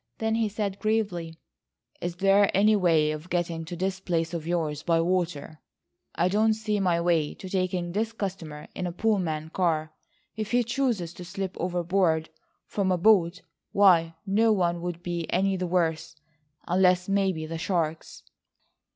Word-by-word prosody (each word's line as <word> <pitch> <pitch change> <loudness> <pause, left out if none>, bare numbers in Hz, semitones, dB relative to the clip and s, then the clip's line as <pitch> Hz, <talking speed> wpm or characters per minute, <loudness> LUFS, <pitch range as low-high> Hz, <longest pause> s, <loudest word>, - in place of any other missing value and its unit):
Then 220 0 -1
he 225 -1 +1
said 200 -1 -3
gravely: 195 -7 -1 0.6
"Is 175 0 -3
there 195 +2 +4
any 210 +2 +5
way 165 -6 +3
of 155 +3 -7
getting 170 -2 -2
to 175 +2 -6
this 190 +2 -2
place 170 -2 -1
of 165 -2 -4
yours 160 -4 -1
by 165 0 +2
water? 165 -3 -1 0.6
I 175 - +2
don't 215 +3 +2
see 215 -1 -1
my 180 -3 +2
way 170 -3 +1
to 190 - -9
taking 185 -2 -1
this 220 +4 -1
customer 180 -8 -6
in 180 - -3
a - - -3
Pullman 170 -6 -1
car. 160 -4 0 0.4
If 215 -1 -4
he 245 0 +4
chooses 235 -8 -1
to 180 - -9
slip 190 +1 -5
overboard 175 -2 0 0.3
from 195 -2 -1
a 180 - +2
boat, 180 -2 +3 0.3
why 170 -5 +5
no 220 +3 +3
one 175 -4 +1
would 175 0 -5
be 170 -2 -3
any 195 +2 +2
the 185 -1 -2
worse, 165 -3 0 0.5
unless 180 0 +3
maybe 195 -5 0
the 165 +1 -5
sharks." 165 -3 -2
180 Hz, 160 wpm, -27 LUFS, 165-195 Hz, 0.6 s, any